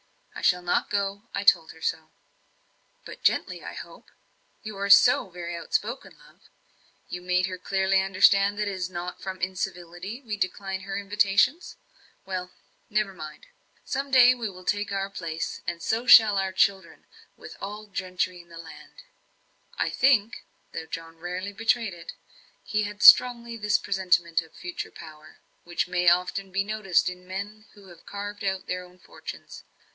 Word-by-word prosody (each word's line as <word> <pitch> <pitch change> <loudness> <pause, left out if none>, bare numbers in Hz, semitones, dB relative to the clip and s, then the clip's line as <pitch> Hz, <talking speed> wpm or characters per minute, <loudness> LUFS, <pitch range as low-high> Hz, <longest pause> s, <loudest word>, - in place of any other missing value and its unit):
I - - -8
shall 180 -1 +2
not 175 - 0
go 200 +2 -2
I 200 - -2
told 200 -6 +4
her 160 - -18
so." 160 -1 -2 1.0
"But - - -10
gently, - - 0
I - - -7
hope? - - -11 0.5
you 215 -2 -7
are 200 0 -2
so 200 -1 +6
very 175 -1 -6
outspoken, 215 +8 -3
love. - - -21 0.7
You 180 - -6
made 180 0 +1
her 185 -1 -6
clearly 190 +1 +1
understand 195 +1 +4
that 210 0 -1
it - - -1
is 185 -1 -3
not 180 0 -6
from 190 -1 -6
incivility 185 +2 -5
we 215 -3 -4
decline 190 0 -3
her 195 +1 -5
invitations? 205 - +1 0.5
Well 185 -1 -4 0.4
never 210 -2 0
mind! 155 - -10 0.4
Some 275 +1 -3
day 255 -1 +7
we 235 -4 -4
will 185 -1 -13
take 205 0 -1
our 195 0 -2
place, 165 -3 -5
and 175 -1 -3
so 230 +3 -1
shall 215 -4 +8
our 190 0 -1
children, 190 -1 0 0.3
with - - -11
any 210 +2 -7
gentry 185 -1 -2
in 170 - -23
the 165 - -12
land." 165 - -12 0.7
I - - 0
think 235 -5 +2 0.3
though 160 - -6
John 165 0 -8
rarely 180 +4 -5
betrayed 225 0 0
it 170 - -9 0.5
he 215 - -1
had 205 0 -5
strongly 235 -2 +7
this 210 -1 +2
presentiment 180 -4 +1
of 160 -1 -17
future 180 -1 -6
power, 155 -1 -13 0.3
which 175 +1 -2
may 180 -1 +3
often 180 +2 0
be 195 +1 0
noticed 210 -3 +1
in 180 0 -11
men 205 +3 -6
who 200 -2 -16
have 170 -1 -17
carved 205 0 -6
out 190 -1 -2
their 180 0 -3
own 180 0 -17
fortunes. - - -10
195 Hz, 165 wpm, -26 LUFS, 180-205 Hz, 1.0 s, shall